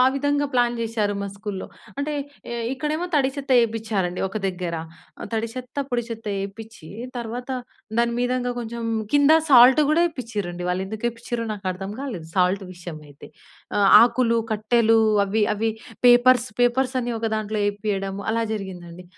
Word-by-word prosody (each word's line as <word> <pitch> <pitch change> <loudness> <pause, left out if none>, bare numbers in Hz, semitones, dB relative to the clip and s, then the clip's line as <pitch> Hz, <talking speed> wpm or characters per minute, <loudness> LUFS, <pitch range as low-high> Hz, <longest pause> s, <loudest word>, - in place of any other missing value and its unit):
విధంగా 285 +1 +1
ప్లాన్ 240 -1 +2
చేశారు 220 -3 -1
మా 200 - -3
స్కూల్‌లో. 200 -2 -6 0.3
అంటే, 300 +1 -2 0.4
ఏహ్! 235 -1 -3
ఇక్కడేమో 305 +5 -2
తడి 270 -2 +3
చెత్త 280 -1 -4
వేపించారండి, 215 -6 -1
ఒక 215 - -4
దగ్గర. 180 -2 -3 0.6
తడి 225 +1 0
చెత్త, 255 0 -8
పొడి 240 -1 0
చెత్త 225 -1 -7
వేపించి 200 -3 -8 0.3
తర్వాత, 240 +2 -5 0.5
దాని 235 0 +2
మీదంగా 245 0 0
కొంచెం 235 0 -5 0.3
కింద 290 +1 +5 0.2
సాల్ట్ 255 +3 +8
కూడా 325 +2 +4
వేపిచ్చిరండి. 210 - -4
వాళ్ళు 185 +1 -1
ఎందుకు 220 +3 -5
ఎపిచ్చిరొ 230 0 -4
నాకు 200 -2 -10
అర్థం 195 +2 -6
కాలేదు, 190 - -6
సాల్ట్ 185 +2 +2
విషయం 175 -3 -8
అయితే. 145 -1 -13 0.5
ఆహ్, 200 -1 +5
ఆకులు, 235 -1 +3
కట్టెలు 225 +1 +3 0.3
అవి 210 +2 +1
అవి 220 +1 0 0.3
పేపర్స్, 245 0 +6
పేపర్స్ 255 +2 +2
అన్నీ 240 0 -2
ఒక 225 - -2
దాంట్లో 215 0 -2
వేపియడము, 200 -1 -2
అలా 230 0 0
జరిగిందండి. 180 -4 -7
225 Hz, 150 wpm, -23 LUFS, 195-245 Hz, 0.6 s, సాల్ట్